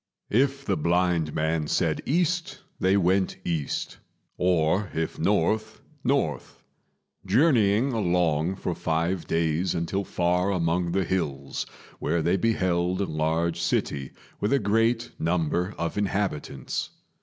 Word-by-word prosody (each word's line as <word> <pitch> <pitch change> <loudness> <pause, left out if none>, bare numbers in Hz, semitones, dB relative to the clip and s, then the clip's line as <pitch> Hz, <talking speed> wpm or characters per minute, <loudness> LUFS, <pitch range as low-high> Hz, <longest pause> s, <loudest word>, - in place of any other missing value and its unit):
If 135 +4 +2
the 100 -3 +1
blind 85 -1 +1
man 80 0 0
said - - +1
east, 175 +3 0 0.2
they 95 +2 +3
went 95 +1 +2
east; 80 -5 -2 0.4
or 90 +2 +2
if 80 0 -2
north, 110 +6 +1 0.2
north; 125 - -1 0.6
journeying 115 - +3
along 90 -4 +1
for 90 -2 -3
five 85 +2 -1
days 80 +2 0
until 85 +4 -1
far 90 +1 +1
among 85 -1 0
the 95 -1 +1
hills, 70 -7 -2 0.3
where 85 -1 0
they 85 +3 +3
beheld 95 -5 +1
a 100 - +1
large 80 +1 0
city 70 -5 -1 0.3
with 105 - 0
a - - +5
great 115 +1 +1
number 85 +3 0
of 85 +4 -2
inhabitants. 100 -6 -2
90 Hz, 120 wpm, -26 LUFS, 80-105 Hz, 0.6 s, a